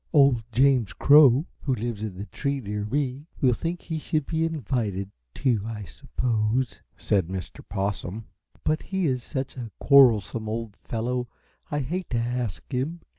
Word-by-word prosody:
"Old 140 -6 +5
James 125 -2 +3
Crow, 140 0 +6
who 135 -3 0
lives 115 -2 -4
in 100 -4 -5
the 100 - -5
tree 140 +4 -2
near 105 -3 -4
me, 140 +4 -2
will 130 -3 +4
think 165 +8 -3
he 160 -2 -3
should 155 -1 -1
be 160 0 0
invited, 120 - -2 0.2
too, 125 -6 +1
I 110 -1 -5
suppose," 110 +6 -1 0.2
said 95 -5 +1
Mr. 95 -1 -6
Possum; 100 +2 -3 0.4
"but 155 +1 +1
he 190 -2 -2
is 130 -4 +1
such 135 +2 -5
a 120 -3 -5
quarrelsome 115 -5 +5
old 110 -2 -4
fellow 125 +2 -2 0.4
I 145 0 -1
hate 175 +8 -3
to 120 - 0
ask 120 -3 -2
him." 145 +7 -2
125 Hz, 160 wpm, -26 LUFS, 110-140 Hz, 0.4 s, Crow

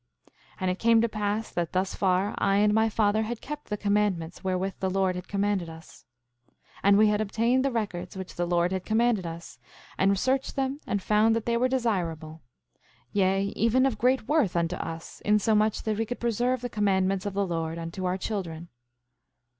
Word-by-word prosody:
5:20 - - -29 0.3
And 185 -1 +1
it 185 - -5
came 230 0 +5
to 230 - +2
pass 215 0 -2
that 170 -2 -2
thus 185 +1 0
far 190 +1 +1
I 195 0 +2
and 210 +1 +4
my 220 +1 +3
father 215 0 +2
had 225 +1 -3
kept 295 0 -8
the 210 - -2
commandments 200 -5 0
wherewith 190 +1 -1
the 190 - 0
Lord 190 0 +1
had 180 - -7
commanded 200 -3 -1
us. 160 +1 -13 0.7
5:21 - - -18
And 200 0 +6
we 215 +1 +6
had 210 0 +1
obtained 230 +5 +1
the 275 - +2
records 200 -6 -4
which 190 -1 -7
the 175 0 -2
Lord 175 0 +1
had 190 -1 -2
commanded 220 -3 +1
us, 165 +1 -9 0.4
and 195 +1 +3
searched 260 +7 0
them 270 +1 -1
and 205 -2 -1
found 215 +1 +3
that 230 - -2
they 235 - +1
were 245 +2 +2
desirable; 170 -11 -2 0.7
yea, 195 0 +1
even 230 +4 +3
of 240 -6 -1
great 250 -2 +2
worth 290 - +2
unto 170 +1 0
us, 165 0 -7
insomuch 210 +1 +2
that 215 -1 -1
we 225 - 0
could 245 - -5
preserve 240 +2 0
the 245 - -2
commandments 195 -2 +1
of 200 - -5
the 200 0 +1
Lord 165 -2 -3
unto 170 +3 -5
our 180 +1 0
children. 170 -5 -5
205 Hz, 200 wpm, -27 LUFS, 185-225 Hz, 0.7 s, And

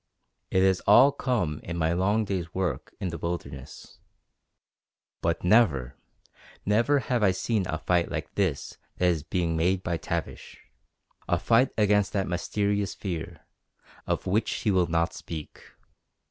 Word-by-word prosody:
It 95 - +2
has 95 -1 +3
all 125 +7 +8
come 110 - -1
in 85 0 -5
my 80 0 +1
long 100 +5 +1
day's 90 -4 -4
work 90 -8 -2
in 95 -3 -2
the 85 -1 -6
wilderness. 85 -6 -6 1.2
But 85 0 -1
never, 90 - +3 0.7
never 115 +8 +3
have 125 -3 -1
I 105 - +5
seen 95 +1 -1
a 80 - -2
fight 85 +1 +1
like 80 -2 -5
this 95 -9 -2 0.2
that 90 - +1
is 85 -3 0
being 85 +1 -1
made 90 +3 +1
by 85 -1 -1
Tavish - - -5 0.7
a 85 - +2
fight 115 +7 +3
against 105 -1 +2
that 100 -2 0
mysterious 100 +3 -1
fear, 85 -4 -6 0.6
of - - -1
which 105 +4 +1
he 105 - 0
will 90 -2 +3
not 85 +1 0
speak. 80 -3 -8
90 Hz, 145 wpm, -27 LUFS, 85-105 Hz, 1.2 s, all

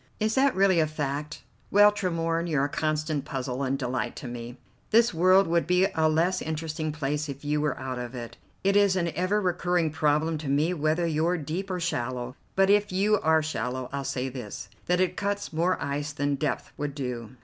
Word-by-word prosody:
"Is 215 0 +1
that 270 +2 +3
really 190 -2 +4
a 155 - +3
fact? 150 -1 -4 0.3
Well, 205 +1 +7
Tremorne, 165 -4 -1
you're 145 -3 +2
a - - -3
constant 155 -1 -1
puzzle 130 -2 -4
and 135 0 0
delight 125 -1 -2
to - - -7
me. 120 +1 -7 0.3
This 230 0 +4
world 185 +4 +5
would 170 0 +1
be 180 +1 +4
a 160 -1 +3
less 170 +4 +1
interesting 155 0 -3
place 150 0 -2
if 140 +1 -7
you 150 0 +1
were 150 - 0
out 130 -1 -4
of 125 +1 -6
it. 120 -2 -7 0.3
It 195 +1 +2
is 200 -2 +4
an 170 -2 0
ever 185 +4 +1
recurring 175 -3 +1
problem 155 +1 +1
to 150 - -6
me 150 +5 +2
whether 155 +1 +1
you're 165 +2 +1
deep 170 +6 -4
or 185 -1 -2
shallow; 125 -6 -3 0.2
but 195 +1 +4
if 205 0 +3
you 205 +3 +2
are 160 -2 +3
shallow 130 -4 -3
I'll 140 0 -2
say 130 -1 -2
this, 125 -5 -7 0.2
that 180 0 +2
it 185 -1 +1
cuts 200 -3 -2
more 170 +3 +1
ice 145 +2 -3
than 145 0 0
depth 140 +1 -2
would 145 -1 -3
do. 125 -4 -5
155 Hz, 205 wpm, -27 LUFS, 140-180 Hz, 0.3 s, Well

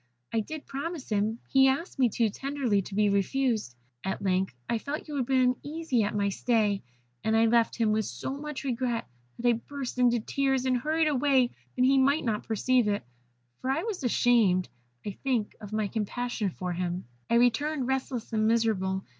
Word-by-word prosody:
I 225 - +2
did 310 +7 -5
promise 285 +2 -5
him 215 +1 0
he 270 0 +5
asked 275 +4 -1
me 250 -2 +5
too 225 0 +1
tenderly 270 -5 0
to 195 +1 -8
be 210 0 +3
refused. 210 - 0 0.3
At 190 - -2
length 185 -6 0
I 230 - 0
felt 290 +7 -5
you 300 - -7
would 265 -4 -1
be 265 -1 +3
uneasy 255 +1 0
at 205 0 -1
my 200 -1 +1
stay, 210 -1 +1 0.4
and 220 0 +2
I 225 - +5
left 230 0 +3
him 225 -2 +2
with 215 0 +1
so 265 - -4
much 295 -1 -6
regret 245 -3 -1 0.3
that 245 - -1
I 240 - +6
burst 255 +2 -5
into 240 -1 +4
tears, 270 +2 0
and 255 -1 +2
hurried 315 +4 +1
away 270 -3 +3 0.2
that 255 - +3
he 270 +1 +5
might 280 +3 +3
not 215 -3 -1
perceive 240 +2 +2
it, 205 0 0 0.6
for 260 - -3
I 270 - +1
was 415 -9 -4
ashamed, 225 -7 +3 0.4
I 205 - -2
think, 235 0 -2
of 205 -1 -8
my 215 -1 0
compassion 220 0 -2
for 180 0 -4
him. 180 +1 -3 0.2
"I 235 - +3
returned, 250 +4 +2
restless 260 -3 -2
and 215 0 +2
miserable. 205 -5 +1
240 Hz, 190 wpm, -28 LUFS, 210-270 Hz, 0.6 s, I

